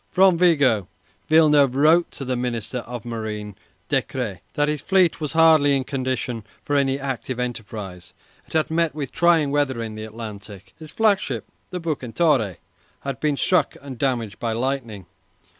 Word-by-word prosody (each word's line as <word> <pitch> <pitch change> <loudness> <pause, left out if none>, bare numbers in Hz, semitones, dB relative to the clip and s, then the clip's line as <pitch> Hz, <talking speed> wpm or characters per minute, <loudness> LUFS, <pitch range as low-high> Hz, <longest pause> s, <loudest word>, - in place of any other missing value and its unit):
From 190 -1 +5
Vigo, 140 - +3 0.4
Villeneuve 150 -4 +5
wrote 160 +5 +4
to 135 - -8
the 130 0 -1
Minister 125 0 -3
of 120 -1 -7
Marine, 110 -3 -5 0.3
Decrès, 115 -8 -2 0.2
that 145 0 +2
his 150 -1 -1
fleet 185 -4 +2
was 150 -1 -3
hardly 160 -3 +5
in 135 - -2
condition 130 -3 -3 0.2
for 145 - -1
any 135 -1 +2
active 130 -2 -4
enterprise. 105 -7 -6 0.4
It - - -14
had 160 0 +1
met 165 -2 +1
with 145 -4 -4
trying 165 -4 +3
weather 140 -4 0
in 115 -1 -4
the 110 0 -7
Atlantic. 105 -3 -9
His 155 -1 -10
flagship, 210 -3 +1 0.2
the 180 - -4
"Bucentaure," 140 - 0 0.4
had 135 -3 -4
been 150 -2 0
struck 180 -3 +2
and 135 -3 -9
damaged 120 -6 -1
by 115 -1 -1
lightning. 115 -5 -3
135 Hz, 160 wpm, -23 LUFS, 115-155 Hz, 0.4 s, From